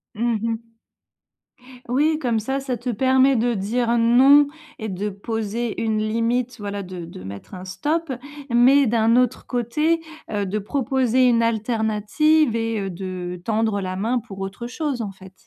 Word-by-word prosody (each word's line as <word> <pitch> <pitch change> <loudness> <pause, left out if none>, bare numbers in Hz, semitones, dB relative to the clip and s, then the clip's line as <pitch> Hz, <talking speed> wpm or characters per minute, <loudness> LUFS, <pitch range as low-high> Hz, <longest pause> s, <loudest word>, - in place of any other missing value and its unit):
Mmh 230 0 0
mh. 230 0 -4 1.2
Oui, 300 +5 +2
comme 240 -7 0
ça, 265 +6 -2
ça 260 -2 -3
te 245 +3 -5
permet 260 +3 +3
de 240 0 +1
dire 235 +4 0
non 265 +5 +6 0.3
et 220 - -4
de 200 +1 -3
poser 220 +3 -3
une 220 -1 0
limite 230 +3 0
voilà 205 -1 -4
de 185 -2 -7
de 165 - -10
mettre 100 - -9
un 185 0 -8
stop, 295 - -2 0.4
mais 255 +3 +5
d'un 230 +1 +3
autre 250 -1 +1
côté, 300 +7 0 0.3
heu, 205 -2 -1
de 200 +3 -2
proposer 255 +2 +1
une 230 -1 +3
alternative 230 +5 +1
et 225 -1 -1
heu, 195 -1 -3
de 180 -1 -6
tendre 220 -1 0
la 185 -1 -4
main 230 +6 0
pour 205 -4 -11
autre 195 +5 -5
chose 270 -1 -3
en 205 -3 -4
fait. 190 0 -14
230 Hz, 165 wpm, -22 LUFS, 205-250 Hz, 1.2 s, non